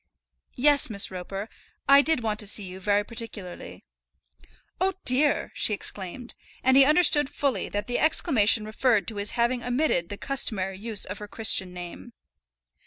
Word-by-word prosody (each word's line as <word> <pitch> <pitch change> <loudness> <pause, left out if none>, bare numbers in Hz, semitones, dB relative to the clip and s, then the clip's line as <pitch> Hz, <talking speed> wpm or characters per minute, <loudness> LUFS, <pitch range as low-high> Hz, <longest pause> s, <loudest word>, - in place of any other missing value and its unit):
"Yes, 285 +1 +2
Miss 200 -3 -1
Roper, 195 +3 -6 0.4
I 280 0 +7
did 315 -3 +2
want 215 -1 -2
to 210 - -3
see 205 +1 0
you 185 0 -9
very 205 +2 +1
particularly." 220 -5 -8 0.9
"Oh, 380 +1 0
dear!" 280 +4 +2
she 210 - +1
exclaimed, 200 +5 -6 0.3
and 260 0 +3
he 275 - +8
understood 300 -2 +4
fully 280 -3 -2
that 205 0 -4
the 245 +1 -2
exclamation 230 - +2
referred 215 -3 0
to 220 - -9
his 205 +4 -3
having 240 +1 0
omitted 245 - 0
the 205 - -6
customary 195 -9 -2
use 220 -1 -2
of 200 - -7
her 210 - -8
Christian 205 -4 +3
name. 180 +6 -10
225 Hz, 160 wpm, -25 LUFS, 200-260 Hz, 0.9 s, he